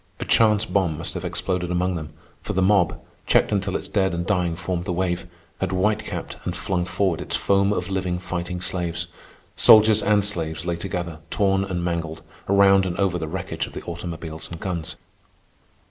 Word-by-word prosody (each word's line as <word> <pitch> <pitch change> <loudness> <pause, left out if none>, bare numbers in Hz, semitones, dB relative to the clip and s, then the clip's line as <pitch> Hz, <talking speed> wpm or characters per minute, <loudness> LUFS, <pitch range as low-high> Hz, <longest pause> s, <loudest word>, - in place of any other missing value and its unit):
A - - -3
chance 110 -1 +4
bomb 90 -8 0
must - - -3
have - - -5
exploded 90 -2 -1
among 90 +1 0
them, 80 -3 -5 0.3
for - - -4
the 95 - +1
mob, 95 -3 +3 0.3
checked - - +4
until 100 -2 0
its - - -3
dead 95 -4 +1
and 85 0 -2
dying 90 -4 +1
formed 90 0 -3
the 95 - -2
wave, 90 -1 -1 0.3
had 95 - -1
white 105 +3 +1
capped - - -5
and - - -3
flung 90 -2 -1
forward 95 -3 0
its - - -3
foam 100 0 +2
of - - -1
living, 95 -2 -1
fighting 90 0 -4
slaves. 85 -1 -2 0.5
Soldiers 110 0 +7
and 105 -1 +3
slaves 80 -6 -2
lay 85 - 0
together, 85 -3 -4
torn 95 0 +2
and 90 -3 -3
mangled, 80 -2 -3 0.3
around 100 -1 +5
and 90 - -4
over 95 -3 +1
the 80 - -3
wreckage 90 +3 -4
of - - -13
the - - -6
automobiles 85 -2 -6
and 85 - -7
guns. 85 -4 -3
90 Hz, 190 wpm, -23 LUFS, 85-95 Hz, 0.5 s, Soldiers